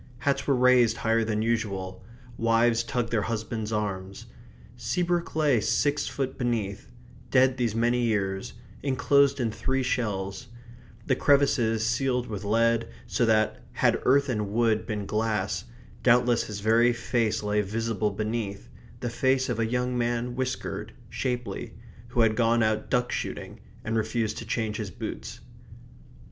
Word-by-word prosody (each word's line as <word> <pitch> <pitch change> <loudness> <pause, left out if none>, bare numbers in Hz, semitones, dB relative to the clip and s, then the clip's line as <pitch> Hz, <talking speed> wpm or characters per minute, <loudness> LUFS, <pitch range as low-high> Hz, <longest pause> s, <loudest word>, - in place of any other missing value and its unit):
Hats 140 +3 -1
were 140 - +4
raised 125 -2 +4
higher 115 0 +1
than 110 -1 -1
usual; 100 -5 -2 0.3
wives 115 0 +3
tugged 115 0 -2
their 115 -2 +2
husbands' 110 0 -3
arms. 100 0 -3 0.5
Seabrook 170 +10 -1
lay 150 -6 +3
six 145 +6 +1
foot 135 -2 -3
beneath, 110 -5 -2 0.4
dead 130 0 +4
these 120 -4 0
many 120 +1 +2
years; 100 -4 -1 0.3
enclosed 140 +1 +3
in 115 -3 0
three 130 +4 -1
shells; 105 -5 -2 0.6
the 130 - +2
crevices 120 -6 +3
sealed 125 +1 0
with 105 -4 -6
lead, 115 +2 +2 0.2
so 120 - 0
that, 110 -1 +2
had - - +2
earth 140 +2 +4
and 105 -5 -1
wood 110 0 +1
been 105 -3 -3
glass, 105 - -1 0.4
doubtless 120 0 +4
his 100 -2 -6
very 115 +3 +4
face 115 -2 0
lay 105 0 +1
visible 110 +1 -1
beneath, 105 - -4 0.3
the 120 - -2
face 130 +2 +1
of 120 -2 -1
a 115 - +1
young 125 +1 -1
man 120 0 -1
whiskered, 130 0 -3 0.2
shapely, 125 -6 -3 0.3
who 120 0 +1
had 110 -1 +3
gone 115 0 +3
out 110 0 0
duck 125 -1 +1
shooting - - -5 0.2
and 115 0 -2
refused 110 0 0
to 115 - -8
change 110 -2 -1
his 105 -3 -4
boots. 85 - -7
115 Hz, 145 wpm, -27 LUFS, 110-125 Hz, 0.6 s, were